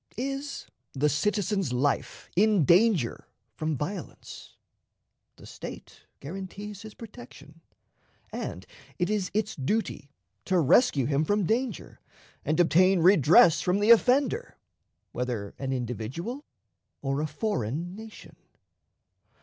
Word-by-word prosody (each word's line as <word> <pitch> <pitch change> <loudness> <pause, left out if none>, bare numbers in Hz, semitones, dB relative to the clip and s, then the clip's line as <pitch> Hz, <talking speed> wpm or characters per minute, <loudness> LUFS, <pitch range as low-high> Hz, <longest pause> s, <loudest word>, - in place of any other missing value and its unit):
Is 275 +3 -4 0.3
the 150 +2 +1
citizen's 195 - 0
life 135 +3 -1
in 205 -4 +4
danger 175 - +3 0.3
from 155 +5 -2
violence? 175 +5 -7 0.8
The - - -15
State - - -10
guarantees 195 +5 -7
his 220 -1 -11
protection, 165 - -13 0.7
and 90 +2 -6 0.3
it 180 +3 0
is 205 -3 -1
its 215 0 -1
duty 145 0 -2 0.4
to 185 - +1
rescue 155 - +4
him 145 +2 +1
from 205 +4 +1
danger 230 +2 -2 0.4
and 155 +3 -1
obtain 180 +2 +4
redress 170 -2 +6
from 180 +2 +1
the 210 +3 +4
offender, 275 - +3 0.5
whether 120 -5 -4
an 135 -1 -3
individual 130 - -4 0.6
or 135 +1 -1
a 155 - -1
foreign 155 - -3
nation. 220 +1 -12
180 Hz, 110 wpm, -27 LUFS, 140-215 Hz, 0.8 s, redress